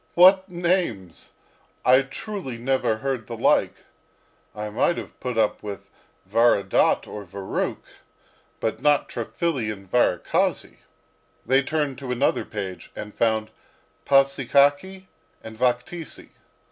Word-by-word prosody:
"What 190 +2 +6
names! 170 - -2 0.6
I 130 +2 +6
truly 135 - -6
never 125 -2 0
heard 130 -2 -3
the 115 - -6
like. - - +2 0.7
I 105 0 -4
might 170 +10 +1
have - - -8
put 125 -3 -4
up 110 -2 +1
with 100 -2 -8 0.4
Varadat 115 -1 +3
or 105 - -8
Varukh, 95 +1 -4 0.7
but 110 - -2
not 145 -1 +3
Triphily 125 0 -2
and 100 -2 -10
Varakhasy!" 105 -8 +1 0.7
They 130 +3 +4
turned 145 -2 -2
to 130 -2 -5
another 125 +3 +1
page 95 -5 -6
and 105 0 -7
found 110 -1 0 0.6
Pavsikakhy 140 +6 +3 0.4
and 110 0 -9
Vakhtisy. 125 +7 -2
125 Hz, 115 wpm, -24 LUFS, 110-145 Hz, 0.7 s, What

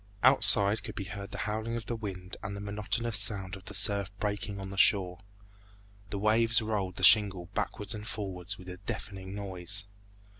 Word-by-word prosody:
Outside 110 -4 +6
could 110 -2 -8
be 100 - -4
heard 100 +1 -7
the - - -7
howling 110 +2 -3
of 115 - -5
the 120 - -3
wind 95 -5 -7
and 100 +1 -5
the - - -6
monotonous 105 +2 -1
sound 100 -2 +2
of 95 - -13
the 105 - -8
surf 100 0 +1
breaking 105 -1 -3
on 95 0 -7
the - - -7
shore. 95 -2 +3 0.9
The 100 - -4
waves 115 +3 +4
rolled 105 -5 -2
the - - -6
shingle 95 -5 +5
backwards 105 +1 -2
and 105 0 -7
forwards 95 -3 -3
with 90 - -13
a 90 - -7
deafening 100 -2 -6
noise. 100 0 -2
100 Hz, 185 wpm, -30 LUFS, 95-110 Hz, 0.9 s, Outside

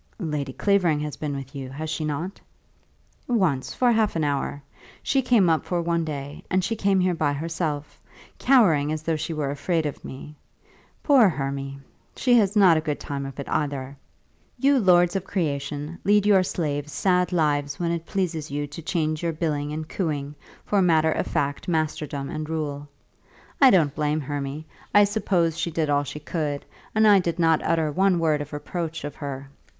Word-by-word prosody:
"Lady 150 -7 -3
Clavering 180 -2 +2
has 150 -1 -4
been 145 -2 -4
with 135 -1 -7
you; 135 -2 -6
has 150 +4 -5
she 155 0 -3
not?" 160 +6 -4 0.9
"Once, 185 - +1
for 245 -1 +2
half 220 -4 +2
an 160 - 0
hour. 145 0 -2 0.4
She 270 - +2
came 240 -7 +4
up 160 -1 +2
for 175 - -1
one 170 0 0
day, 145 -2 -6
and 185 0 +1
came 200 -2 +1
here 180 -1 +2
by 150 -3 0
herself, 155 -1 -4 0.4
cowering 175 - +4
as 155 0 -3
though 165 0 0
she 155 +2 -4
were 150 -3 -2
afraid 160 +3 -1
of 145 - -5
me. 145 +3 -9 0.7
Poor 260 -9 +6
Hermy! 140 -2 -4 0.4
She 250 - +2
has 205 -1 +1
not 185 -6 +6
a - - +1
good 150 -2 -3
time 140 -1 -4
of 135 - -10
it 140 - -5
either. 140 -2 -2 0.6
You 275 +2 +3
lords 175 -3 +4
of 195 - -1
creation 150 -2 -3
lead 205 0 +3
your 200 -2 +5
slaves 150 -5 -2
sad 180 +1 +1
lives 145 -4 0
when 170 -1 0
it 170 -1 -3
pleases 170 -6 -2
you 145 +1 -2
to 145 +3 -9
change 155 -2 -1
your 170 -1 -1
billing 150 -2 -2
and 155 0 -5
cooing 150 -6 -3 0.3
for 205 -1 +2
matter 160 -3 +3
of - - -1
fact 140 0 -2
masterdom 155 -4 -2
and 155 +1 -5
rule. 145 -2 -4 0.7
I 270 - +9
don't 160 - +4
blame 150 +1 0
Hermy. 145 +2 -4 0.3
I 205 - +8
suppose 180 -6 +1
she 170 - -1
did 155 -2 -1
all 145 0 +2
she 145 +2 -7
could, 150 -2 -3 0.3
and 220 0 +5
I 205 -2 +7
did 170 -1 -2
not 165 -2 +3
utter 160 -2 +1
one 190 +2 +3
word 155 -3 +1
of 145 - -7
reproach 160 +2 -4
of 145 - -5
her. 140 -2 -6
155 Hz, 185 wpm, -24 LUFS, 145-180 Hz, 0.9 s, I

